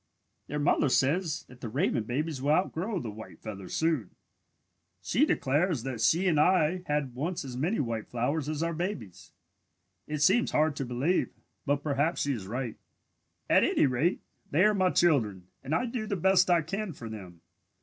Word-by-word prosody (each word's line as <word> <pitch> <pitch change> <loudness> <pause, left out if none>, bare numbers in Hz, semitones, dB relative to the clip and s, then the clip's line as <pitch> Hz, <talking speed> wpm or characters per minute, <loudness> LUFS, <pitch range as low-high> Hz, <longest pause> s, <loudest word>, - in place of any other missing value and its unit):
"Their 150 - -3
mother 145 -1 +2
says 150 +6 +1
that 125 -1 -16
the 115 - -4
raven 125 - 0
babies 140 +4 -2
will 140 - -1
outgrow 185 +4 0
the 115 -7 -5
white 110 +1 -11
feathers 100 -4 -7
soon. 160 - 0 0.9
She - - +2
declares 145 0 +1
that 125 -4 -4
she 175 +10 +3
and 160 -4 +3
I 180 +1 +3
had 145 -4 -1
once 165 +5 -3
as 130 -2 -6
many 165 - 0
white 115 -4 -2
feathers 140 +5 -1
as 155 +1 -2
our 170 0 -1
babies. 110 - -5 0.8
It 150 -1 -1
seems 225 +9 +4
hard 155 -1 +2
to 135 - -2
believe, 130 +9 0 0.4
but 145 0 +1
perhaps 145 +3 0
she 140 - +1
is 100 -7 -6
right. 120 +1 -4 0.7
"At - - +5
any - - +3
rate, 140 +7 0 0.3
they 160 +6 +3
are 210 0 +5
my 185 -2 +2
children 110 - +1
and 140 +4 -2
I 250 - +1
do 230 -2 -4
the 200 - -1
best 185 +1 +3
I 170 -2 +4
can 195 +3 -4
for 115 - -9
them. 95 -6 -9
150 Hz, 180 wpm, -29 LUFS, 125-175 Hz, 0.9 s, At